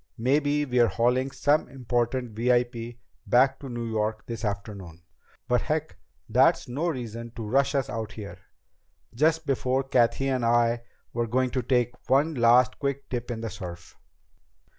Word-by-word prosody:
Maybe 145 +4 +1
we're 125 -3 +3
hauling 125 +4 +1
some 145 +3 +1
important 125 -1 -1
VIP 120 +1 0 0.3
back 130 +5 +4
to 135 - -8
New 120 -1 -4
York 110 -1 -2
this 115 -1 -6
afternoon. 100 -5 -5 0.4
But 125 -1 +2
heck, 155 +1 -2 0.3
that's - - +3
no 140 +8 -2
reason 115 -6 -4
to 115 - -5
rush 140 +4 +2
us 135 -2 +1
out 110 -1 -5
here, 105 -2 -8 0.7
just 160 +5 +2
before 130 -1 0
Cathy 130 0 +2
and 130 -2 0
I 115 0 +3 0.3
were 120 0 -1
going 130 +2 +1
to 130 - -1
take 125 0 -1
one 145 +5 +3
last 125 0 +4
quick 140 0 -3
dip 120 -1 -4
in 115 -2 -4
the 115 -2 -4
surf." 90 -4 -9
120 Hz, 155 wpm, -26 LUFS, 115-135 Hz, 0.7 s, back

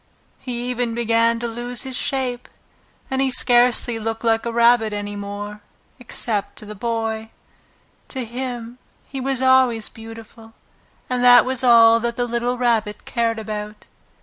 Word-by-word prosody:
He 245 -2 -5
even 240 -2 -2
began 230 0 +2
to 240 - -2
lose 240 +2 -1
his 260 -1 -6
shape, 250 -2 -3 0.6
and 265 0 0
he 270 - +2
scarcely 245 -2 +3
looked 225 +1 -4
like 225 0 +1
a - - -2
rabbit 235 -2 +3
any 205 0 -5
more, 205 +1 -7 0.4
except 225 -4 -3
to - - -11
the 210 - -8
Boy. 225 0 -3 0.8
To 260 -3 -5
him 240 0 -6 0.3
he 270 -1 -7
was 265 0 -1
always 260 -4 +3
beautiful, 225 0 -12 0.5
and 250 -1 -1
that 245 -2 +7
was 260 0 +1
all 230 -2 +6
that 235 0 -3
the 245 - -1
little 240 +1 -2
Rabbit 230 -4 0
cared 230 -2 -1
about. 210 -1 -6
235 Hz, 150 wpm, -21 LUFS, 225-245 Hz, 0.8 s, that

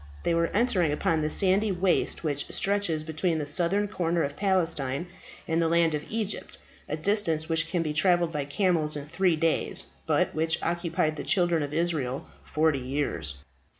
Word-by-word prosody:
They - - +1
were 165 0 +2
entering 195 -8 +2
upon 155 +2 +1
that 155 - 0
sandy 195 +5 +3
waste 180 -1 +1
which 145 -3 -2
stretches 195 -6 0
between 160 +2 -1
the 150 - -2
southern 185 +7 +1
corner 170 -4 0
of 140 0 -3
Palestine 165 -7 0 0.4
and 165 +1 +1
the 165 - +2
land 165 -1 +3
of 150 0 -3
Egypt, 215 -2 -4 0.3
a 150 - -2
distance 165 -3 +1
which 165 0 +1
can 170 0 -1
be 155 -2 -2
travelled 175 +1 +3
by 150 -3 -2
camels 155 -1 +1
in 145 -1 -5
three 165 +3 +1
days, 165 +1 0 0.2
but - - +2
which 160 +1 +1
occupied 170 -2 0
the - - -4
Children 175 -3 +2
of 145 -1 -3
Israel 150 -5 -1 0.2
forty 155 -2 +1
years. 125 - -2
165 Hz, 175 wpm, -27 LUFS, 150-180 Hz, 0.4 s, sandy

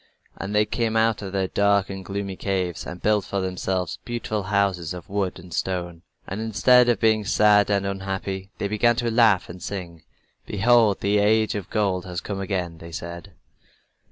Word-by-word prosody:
And 100 +2 -5
they 105 0 +4
came 115 0 -1
out 110 -1 +2
of 95 -2 -6
their 95 -1 0
dark 100 0 +2
and 95 -1 -6
gloomy 100 +1 -4
caves 90 -5 -2
and 90 - -8
built 105 -1 +3
for 100 - -3
themselves 95 -1 -2
beautiful 115 -3 -3
houses 95 -4 0
of 90 - -10
wood 100 -2 -1
and 90 -1 -12
stone. 85 -1 -3 0.2
And 100 +3 -5
instead 120 +3 +4
of 120 -5 +2
being 110 -1 +3
sad 105 0 +4
and 100 -1 +1
unhappy 95 0 -4
they 100 - -2
began 115 +3 +2
to 115 0 -1
laugh 110 -5 +4
and 90 +1 -10
sing. 85 -5 -6 0.5
"Behold, 110 0 +3
the 100 +1 +2
Age 110 +1 +3
of 100 -4 -5
Gold 95 -4 0
has 90 -2 -4
come 100 -2 -5
again," 90 -4 -3
they 85 0 -10
said. 85 +1 -7
100 Hz, 185 wpm, -24 LUFS, 90-105 Hz, 0.5 s, they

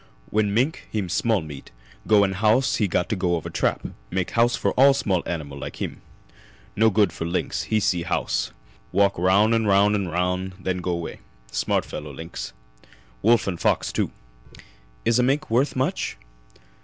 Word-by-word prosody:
When 105 -1 +2
mink 125 +9 0
heem 100 -5 -2
smell 110 +1 +1
meat 75 -3 -9 0.4
go 105 -2 +6
in 95 - +1
house 110 +7 +2
he 105 - +2
got 90 0 0
to 110 - 0
go 90 -2 +1
over 80 - -5
trap. - - 0 0.2
Make 95 -1 -2
house 120 +1 +3
for - - 0
all 135 +1 +5
small 95 -9 0
animal 70 -5 -4
like - - -6
heem. - - -5 0.7
No 110 +1 +5
good 105 -4 +2
for - - -5
lynx. 85 +2 -2
He 110 - +1
see 90 -4 +1
house - - -1 0.4
walk 100 +1 +3
roun' 100 +5 +4
'n' 110 -1 +2
roun' 100 +1 +4
'n' 100 -3 0
roun' 90 +2 -1
and 95 - -18
then 95 -1 0
go 90 -1 -1
'way. 85 -1 -6 0.3
Smart - - 0
fellow 75 0 -7
lynx. 80 +4 -7 0.7
Wolf 115 +2 +4
and 90 -4 -3
fox, - - +1
too." - - 0 1.0
"Is 115 +1 +3
a - - +5
mink 135 +1 0
worth 130 +5 +2
much?" 130 - -1
100 Hz, 180 wpm, -24 LUFS, 90-110 Hz, 1.0 s, go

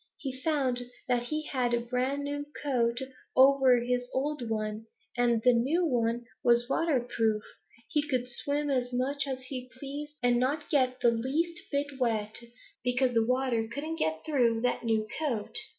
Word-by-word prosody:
He 260 -2 -6
found 260 -5 0 0.2
that 245 -1 +1
he 305 +4 -2
had 245 -4 0
a - - +1
brand 255 +4 -1
new 290 0 -3 0.2
coat 240 -4 +1 0.4
over 265 -1 +6
his 245 +1 -1
old 270 -3 -1
one, 215 0 -3 0.3
and 240 -2 +2
the 250 - +6
new 285 +10 +2
one 240 -4 0 0.2
was 240 0 +4
waterproof. 240 -8 +1 0.4
He 295 - +1
could 255 -3 0
swim 285 +4 0
as 250 -2 0
much 275 +3 -1
as 260 -1 -4
he 255 -1 -6
pleased 290 +2 -6
and 245 -1 +4
not 285 +5 -1
get 255 -3 +2
the 240 - +5
least 310 +9 -1
bit 285 -1 -2
wet, 220 -3 0 0.5
because 250 0 +2
the 230 -1 +4
water 250 -3 +1
couldn't 310 +6 -4
get 160 0 -1
through 240 -7 +2
that 250 0 0
new 220 -2 +1
coat. 255 - -2
250 Hz, 165 wpm, -29 LUFS, 235-280 Hz, 0.5 s, over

